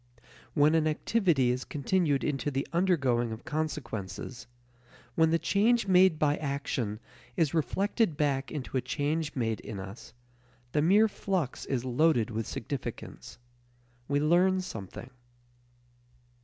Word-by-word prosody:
When 150 0 +5
an 160 -1 +3
activity 155 - +2
is 125 +1 -2
continued 150 -1 0
into 145 0 -1
the 135 0 -2
undergoing 135 -10 +2
of 110 +4 -8
consequences, 130 -9 -4 0.7
when 160 +4 +3
the 165 - +3
change 215 +6 +2
made 185 -3 +5
by 150 -1 +2
action 140 -7 -3 0.4
is 160 -5 +2
reflected 190 - 0
back 140 -2 0
into 140 -3 -5
a - - +1
change 145 +4 -2
made 115 -4 -1
in 100 - -7
us, 100 +4 -9 0.6
the 150 - +2
mere 200 +7 +5
flux 190 - -3
is 130 -2 -1
loaded 125 -3 +2
with 110 -1 -3
significance. - - -6 0.7
We 145 +1 +1
learn 180 +5 +3
something. 115 - -8
145 Hz, 130 wpm, -29 LUFS, 125-170 Hz, 0.7 s, When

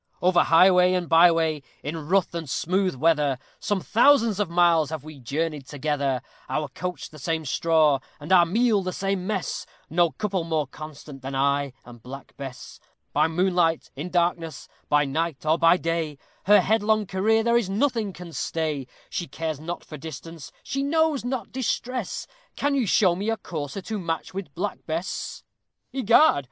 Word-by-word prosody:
Over 175 -1 +4
highway 180 +2 +6
and 180 -2 -1
by 165 +2 +7
way, 160 -2 0 0.2
in 155 +1 -5
rough 190 -2 +2
and 165 -4 -5
smooth 185 +4 0
weather, 145 -1 +2 0.2
Some 205 -2 -1
thousands 230 -3 +4
of 205 -4 0
miles 170 -3 +3
have 155 -3 -5
we 155 -2 -11
journeyed 145 +2 -3
together; 140 -3 -1 0.3
Our 150 -2 -1
couch 180 +5 -5
the 155 - -12
same 160 +2 -2
straw, 155 0 +3 0.2
and 150 +4 -7
our 180 -2 +8
meal 220 +2 +2
the 185 -1 -3
same 195 -1 -2
mess 200 -5 -3 0.2
No 170 +1 +3
couple 195 +1 -2
more 160 -2 0
constant 145 -1 -10
than 135 +1 -5
I 140 0 +1
and 120 -1 -13
Black 135 +3 -10
Bess. 135 -3 -9 0.3
By - - +3
moonlight, 175 -1 +1
in 150 +6 -5
darkness, 170 -2 -1 0.2
by 145 0 +4
night, 155 +2 -2
or 155 +2 +2
by 165 +2 +6
day, 165 -4 -2 0.3
Her 205 0 +7
headlong 215 +1 +2
career 215 +4 +2
there 235 +1 +2
is 235 -5 +2
nothing 220 -1 0
can 175 -2 -10
stay; 155 -6 -2 0.2
She 175 - -4
cares 155 +1 -4
not 170 +3 -5
for 150 - -9
distance, 160 0 -9
she 275 - -2
knows 310 -1 +1
not 245 -3 -3
distress: 250 -3 -2 0.3
Can 285 0 0
you 260 -6 +1
show 180 -2 +4
me 200 +5 -2
a 225 - 0
courser 150 0 -5
to 215 +1 -4
match 165 -2 -3
with 190 -6 -6
Black 200 +3 -3
Bess? 165 +4 -4 0.5
"Egad! 260 - +5
170 Hz, 170 wpm, -25 LUFS, 150-195 Hz, 0.5 s, our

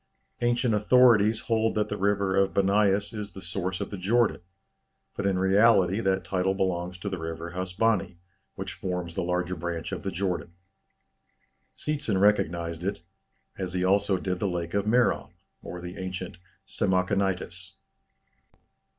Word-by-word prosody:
Ancient 120 0 +2
authorities 110 0 +5
hold 115 -1 +1
that 105 -1 0
the - - -2
river 100 -1 +1
of 95 0 +2
Bâniâs 100 +1 +2
is 105 -3 -6
the 95 - -9
source 95 0 -3
of - - -5
the 100 - -5
Jordan, 115 +5 +2 0.7
but 100 - -1
in 95 -2 +1
reality 95 0 +4
that 95 -1 +1
title 95 0 0
belongs 90 -1 -1
to 90 - -7
the 95 -2 -3
river 80 +1 -5
Hasbany, 95 +1 0 0.4
which 95 +1 -5
forms 90 -4 -4
the 95 - -2
larger 90 +1 -1
branch 85 0 -4
of - - -4
the 100 - -3
Jordan. 90 -2 -3 1.2
Seetzen 145 -10 -1
recognized 85 -4 +1
it, 95 -3 -2 0.6
as 90 -2 -3
he 90 -1 0
also 100 +1 +3
did 90 0 -3
the 100 - 0
Lake 85 -2 -3
of 100 0 +1
Merom, 120 +2 +2 0.3
or 90 - -7
the 90 +2 -8
ancient 95 -1 -5 0.3
Samachonitis. 95 -1 -1
95 Hz, 150 wpm, -27 LUFS, 90-105 Hz, 1.2 s, authorities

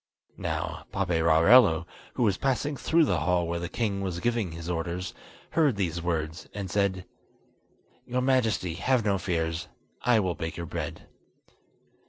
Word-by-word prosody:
Now - - -3
Paperarello, 85 +1 +5 0.3
who 125 - +1
was 100 -4 +3
passing 135 +5 0
through 160 +4 +3
the 90 - +1
hall 85 +2 +1
where 85 0 -2
the 85 0 -4
king 100 -3 -1
was 90 -3 -3
giving 115 -4 0
his 85 0 -7
orders, 90 +1 -3 0.4
heard 150 -7 +3
these 85 -4 -1
words, 80 -1 -3
and 100 -3 -4
said: 100 -2 0 1.0
"Your 125 +1 0
Majesty, 120 -9 +1
have 120 +6 +1
no 100 -2 +2
fears; 80 -2 -2 0.3
I 120 -2 +4
will 95 -4 0
bake 80 +1 -5
your 85 - -4
bread." - - -5
90 Hz, 150 wpm, -27 LUFS, 85-115 Hz, 1.0 s, Paperarello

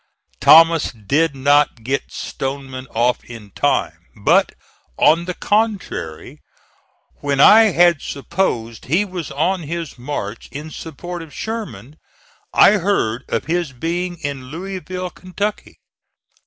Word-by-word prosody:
Thomas 165 0 +6
did 140 +8 0
not 145 -3 +2
get 135 +4 -2
Stoneman 135 -1 -5
off 120 +2 0
in 110 -4 -11
time, - - -1
but, - - +3 0.4
on 170 +2 +4
the 180 0 -4
contrary, 205 - -2 0.8
when 140 -1 -2
I 220 +9 +8
had 175 -6 +4
supposed 130 - -3
he 170 - +1
was 180 -5 -6
on 170 +7 0
his 165 -3 -6
march 120 -5 -5
in 150 +3 -7
support 175 +3 -7
of 160 -2 -11
Sherman 155 - -6 0.5
I 210 - +6
heard 140 - 0
of 115 - -1
his 170 -3 -1
being 175 +6 -3
in 140 -4 -5
Louisville, 185 +4 -6
Kentucky. 200 +3 -5
155 Hz, 120 wpm, -19 LUFS, 130-180 Hz, 0.8 s, I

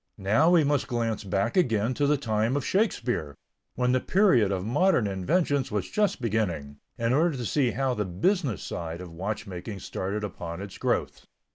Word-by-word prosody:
Now 110 - +3
we 175 -3 +5
must 145 -1 +1
glance 115 -3 -1
back 100 +3 -1
again 115 - +2
to 145 +3 +1
the 150 0 +3
time 115 0 0
of 140 - -3
Shakespeare, 120 - 0 0.4
when 125 0 +1
the 130 - +3
period 130 - +3
of 95 -1 -2
modern 160 - +3
inventions 130 - 0
was 105 -3 -3
just 205 -2 +1
beginning, 90 - -2 0.2
in 115 +1 +1
order 160 +1 +2
to 120 - -4
see 135 +1 +2
how 135 +1 0
the 105 - -1
business 110 - 0
side 85 0 -5
of 90 -2 -8
watchmaking 100 +1 -5
started 100 +4 -4
upon 85 -4 -5
its 100 -1 -8
growth. - - -1
115 Hz, 175 wpm, -27 LUFS, 95-140 Hz, 0.4 s, we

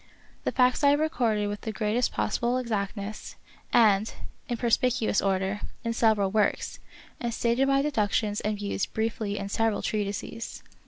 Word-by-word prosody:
The - - +1
facts 255 +2 +3
I 285 - +7
have 290 +1 +4
recorded 235 -9 +1
with 205 0 -4
the 220 - -3
greatest 215 +3 0
possible 235 - 0
exact 215 -5 -2
ness, 205 +2 -6 0.4
and 215 -2 +4 0.4
in 240 - -1
perspicuous 235 -2 +2
order, 195 +1 0 0.2
in 230 - -1
several 215 -4 +3
works, 210 0 0 0.4
and 235 - -2
stated 235 +3 +1
my 275 0 +3
deductions 210 -6 0
and 210 0 -1
views 200 -1 -2
briefly 220 -2 -2
in 200 - -3
several 225 +1 0
treatises. 210 +2 -3
220 Hz, 155 wpm, -27 LUFS, 205-240 Hz, 0.4 s, I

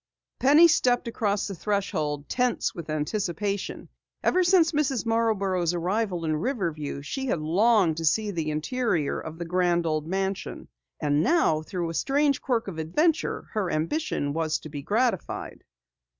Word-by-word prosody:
Penny 295 +6 +7
stepped 245 -7 +2
across 210 -3 -1
the 200 - -5
threshold, 155 -7 -2
tense 250 -1 0
with 165 -2 -8
anticipation. 195 +5 -2 0.4
Ever 370 - +3
since 345 -2 +4
Mrs. 280 -6 0
Marborough's 200 -6 +1
arrival 180 0 -1
in 155 -1 0
Riverview 160 - -3
she 265 - -4
had 235 - +1
longed 180 +1 +3
to 165 - -2
see 210 +7 +2
the 165 -4 -2
interior 155 - -1
of 160 0 -8
the 170 - -5
grand 175 0 +1
old 155 -1 -1
mansion. 190 +2 -3 0.3
And 145 0 +1
now, 170 - +3
through 170 +1 -4
a - - -7
strange 280 - +1
quirk 235 -5 -1
of 170 -5 -5
adventure, 305 - 0
her 210 -5 -1
ambition 160 - -1
was 160 0 0
to 155 - -9
be 145 -1 -6
gratified. 225 - -1
190 Hz, 150 wpm, -26 LUFS, 160-240 Hz, 0.4 s, Penny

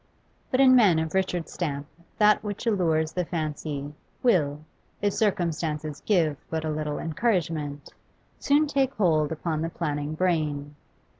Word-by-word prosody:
But 255 - 0
in 260 -1 +7
men 205 -9 +6
of 160 0 -2
Richard's 185 -3 -1
stamp 145 -5 -3 0.3
that 210 0 +4
which 205 +2 -5
allures 165 -8 +1
the 180 - -1
fancy 150 -3 -4 0.3
will, 150 - +2 0.4
if 205 -1 0
circumstances 160 -7 -1
give 165 -8 +2
but 160 -1 -2
a 155 - -1
little 150 -1 -2
encouragement, 160 -6 -2 0.5
soon 290 +2 +3
take 275 -2 0
hold 160 -7 +2
upon 160 -1 -2
the 165 - -1
planning 150 -2 -3
brain. 155 -5 0
160 Hz, 140 wpm, -26 LUFS, 150-195 Hz, 0.5 s, in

